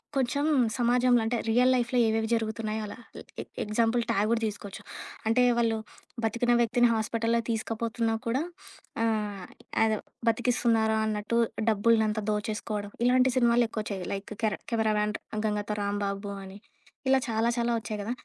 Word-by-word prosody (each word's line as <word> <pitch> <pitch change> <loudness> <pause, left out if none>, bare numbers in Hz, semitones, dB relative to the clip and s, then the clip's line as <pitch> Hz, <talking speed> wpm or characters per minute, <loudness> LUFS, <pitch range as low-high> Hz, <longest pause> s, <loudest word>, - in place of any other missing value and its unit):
కొంచెం 275 +2 +1 0.3
సమాజంలో 245 0 +3
అంటే 235 +1 0
రియల్ 250 +3 +4
లైఫ్‌లో 245 0 +1
ఏవేవి 220 0 +1
జరుగుతున్నాయో 220 -1 -1
అలా. - - -8 0.2
ఎ - - -8 0.2
ఎ - - -5 0.2
ఎగ్జాంపుల్ 225 +3 +1
'ఠాగూర్' 225 +1 +2
తీసుకోవచ్చు 205 -2 -4 0.5
అంటే 240 +3 +4
వాళ్ళు 230 -1 +2 0.5
బతికిన 235 +2 +1
వ్యక్తిని 240 +1 +4
హాస్పిటల్లో 230 +1 0
తీసకపోతున్నా 225 0 -1
కూడా 250 +4 +1 0.6
ఆహ్, 210 -4 -1 0.4
అదే 220 -1 +2 0.3
బతికిస్తున్నారా 230 -2 +2
అన్నట్టు 215 +2 0 0.3
డబ్బుల్నం‌తా 220 0 +2
దోచేసుకోవడం 210 -1 -3
ఇలాంటి 255 +1 +4
సినిమాలు 240 -1 +4
ఎక్కువొచ్చాయి 210 -4 -4
లైక్ 195 +2 -5
కెర 215 -2 +2 0.2
'కెమెరామన్ 215 -2 +1 0.3
గంగతో 210 0 -2
రాంబాబు' 200 0 -2
అని 190 +1 -10 0.5
ఇలా 265 0 +5
చాలా 225 +1 +1
చాలా 235 0 +1
ఒచ్చాయి 220 -1 -5
గదా! 225 - -3
225 Hz, 130 wpm, -28 LUFS, 210-235 Hz, 0.6 s, ఇలా